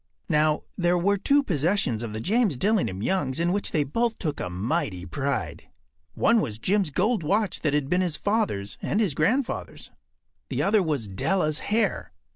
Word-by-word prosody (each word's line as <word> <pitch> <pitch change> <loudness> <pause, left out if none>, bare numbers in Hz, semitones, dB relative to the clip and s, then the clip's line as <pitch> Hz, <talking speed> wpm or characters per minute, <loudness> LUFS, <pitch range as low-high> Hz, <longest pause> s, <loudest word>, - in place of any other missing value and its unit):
Now, 155 -1 +2 0.2
there 175 0 +3
were 200 +3 +1
two 285 +7 +4
possessions 160 - 0
of 115 -2 -5
the 110 - -5
James 205 - +1
Dillingham 125 - 0
Youngs 145 -4 0
in 170 +1 +1
which 200 - -2
they 150 - +2
both 230 - -1
took 150 -5 -3
a 90 - -3
mighty 100 - -2
pride. 140 +9 -3 0.5
One 230 -1 +3
was 105 - -4
Jim’s 190 - +1
gold 210 - +1
watch 200 +6 0
that 150 -2 +1
had 145 -2 0
been 180 +5 +1
his 175 -4 -1
father’s 200 - -1
and 205 - 0
his 200 -9 +1
grandfather’s. 225 - -1 0.6
The - - -1
other 205 +1 +3
was 150 - -1
Della’s 155 - 0
hair. 220 +2 0
170 Hz, 175 wpm, -25 LUFS, 135-205 Hz, 0.6 s, two